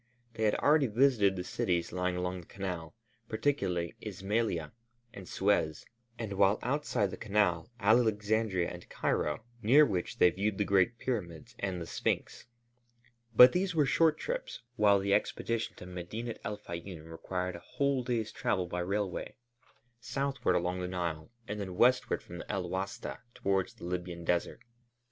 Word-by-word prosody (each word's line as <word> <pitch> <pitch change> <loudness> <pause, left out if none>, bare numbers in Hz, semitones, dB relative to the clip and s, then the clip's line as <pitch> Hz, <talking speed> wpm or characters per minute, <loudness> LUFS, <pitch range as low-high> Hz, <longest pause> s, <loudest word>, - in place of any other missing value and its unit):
They 110 - -1
had 105 - +3
already 145 -2 +4
visited 110 -4 +3
the 90 - -3
cities 85 -1 -1
lying 90 0 -1
along 90 0 -2
the 85 - -18
Canal, 90 -3 -5 0.3
particularly 110 - 0
Ismailia 95 -6 -1 0.4
and 95 -2 -10
Suez, 95 -6 +1 0.3
and 110 -4 -4
while 100 +1 +4
outside 125 -7 0
the - - -6
Canal, 100 -6 +1
Alexandria 110 -3 +2
and 90 0 -10
Cairo, 75 +8 -1 0.2
near 135 +7 +7
which 90 -7 -2
they 90 - +6
viewed 100 +3 -1
the 105 - +1
great 100 +5 +3
pyramids 90 -12 -4
and 95 -2 -2
the 85 - -5
Sphinx. - - -2 0.9
But 125 +3 +10
these 180 -1 0
were 150 -3 +4
short 155 +3 +3
trips, - - -4
while 105 -4 +5
the 100 0 +1
expedition 115 +2 -1
to - - -10
Medinet 90 +6 -6
el 105 0 -3
Fayûm 85 -4 -8
required 90 +2 -3
a - - -7
whole 140 +5 0
day's 115 -3 -1
travel 90 -2 0
by 90 0 -4
railway, 95 +1 -2 0.6
southward 135 +1 -1
along 90 +1 0
the 90 - -2
Nile 85 -3 -3 0.2
and 105 +1 -4
then 95 -3 -5
westward 125 +5 +3
from 90 0 -8
El 95 -4 -2
Wasta 95 +2 -4 0.2
towards 95 -1 0
the - - -15
Libyan 90 -1 -4
Desert. 85 0 0
100 Hz, 155 wpm, -31 LUFS, 90-115 Hz, 0.9 s, But